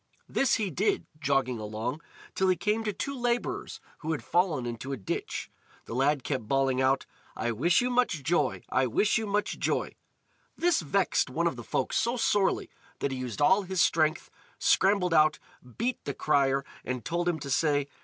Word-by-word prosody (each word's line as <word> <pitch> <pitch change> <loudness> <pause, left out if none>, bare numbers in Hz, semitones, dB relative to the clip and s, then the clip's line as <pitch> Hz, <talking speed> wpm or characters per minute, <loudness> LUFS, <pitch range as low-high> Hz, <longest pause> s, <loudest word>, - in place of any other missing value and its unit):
This 270 - +2
he 205 -4 -1
did, 195 +8 0
jogging 135 -5 +1
along, 110 +7 -4 0.3
till 190 - +1
he 185 - +4
came 210 +4 0
to 210 - +1
two 275 +7 -4
labourers 245 -1 -2 0.2
who 160 0 -2
had 140 -7 -4
fallen 175 -8 +1
into 120 +3 -5
a 135 - -2
ditch. 95 - -4 0.3
The - - -7
lad 135 +2 +2
kept 130 -7 -3
bawling 135 0 +2
out: 130 +1 +2 0.3
"I 120 +2 -1
wish 165 - +3
you 250 +1 0
much 240 - +1
joy! 170 +5 +1
I 130 0 +2
wish 210 - +2
you 220 - -3
much 205 +1 -1
joy!" - - -1 0.6
This 345 -1 +2
vexed - - +1
one - - -1
of - - +1
the - - -8
folk - - -2
so 235 +2 +1
sorely 205 -4 +2 0.3
that 140 - -2
he 130 - -4
used 125 +2 -2
all 190 +6 +5
his 190 -1 -3
strength, 155 -1 +2 0.3
scrambled 190 -3 +3
out, 155 -1 +5 0.4
beat 245 +2 -1
the - - -3
crier, 140 -2 +2 0.2
and 125 -3 -4
told 175 +1 0
him 170 - 0
to 140 -2 -6
say. 145 0 +2
155 Hz, 185 wpm, -28 LUFS, 130-200 Hz, 0.6 s, all